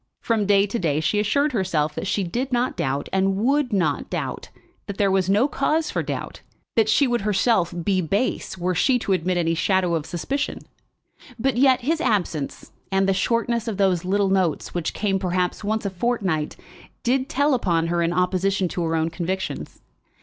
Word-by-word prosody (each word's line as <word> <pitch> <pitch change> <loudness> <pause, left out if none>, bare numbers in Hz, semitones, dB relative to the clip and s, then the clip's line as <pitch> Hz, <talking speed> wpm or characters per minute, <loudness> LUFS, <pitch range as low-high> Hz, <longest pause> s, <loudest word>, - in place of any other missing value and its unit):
From 220 -4 0
day 200 -1 +5
to 210 +3 -3
day 155 -4 +1
she 205 +6 +1
assured 280 +8 +1
herself 170 - 0
that 195 - -4
she 200 +1 0
did 245 +9 -3
not 245 +1 0
doubt 140 -5 -2
and 190 0 +2
would 270 +4 +1
not 195 -4 0
doubt, - - -4 0.4
that 200 -2 -5
there 200 -2 +2
was 190 -1 +1
no 210 +7 +4
cause 305 +2 0
for - - -1
doubt; - - -5 0.3
that 220 -2 +3
she 280 +6 +4
would 240 -3 0
herself 205 -2 +2
be 190 -1 +1
base 195 +3 -1
were 180 +1 -1
she 250 +9 +3
to 200 -5 -1
admit 180 0 0
any 165 -1 +1
shadow 180 +1 +1
of 160 -2 -2
suspicion. 275 - -2 0.8
But 265 +3 0
yet 260 0 +4
his 315 +6 0
absence, 185 - -1 0.2
and 195 0 +2
the 195 - +3
shortness 230 +3 0
of 215 -4 -3
those 190 -4 +2
little 195 +2 +1
notes, 185 -5 0
which 175 -2 -2
came 195 -2 0
perhaps 180 +1 -1
once 215 +1 -1
a 200 - -1
fortnight, 185 -7 -1 0.5
did 260 +2 +1
tell 285 +2 +2
upon 170 -9 +1
her 170 +1 0
in 170 0 +1
opposition 185 +2 +1
to 175 -1 -3
her 165 0 0
own 160 +1 0
convictions. 185 +3 -4
195 Hz, 190 wpm, -23 LUFS, 175-235 Hz, 0.8 s, day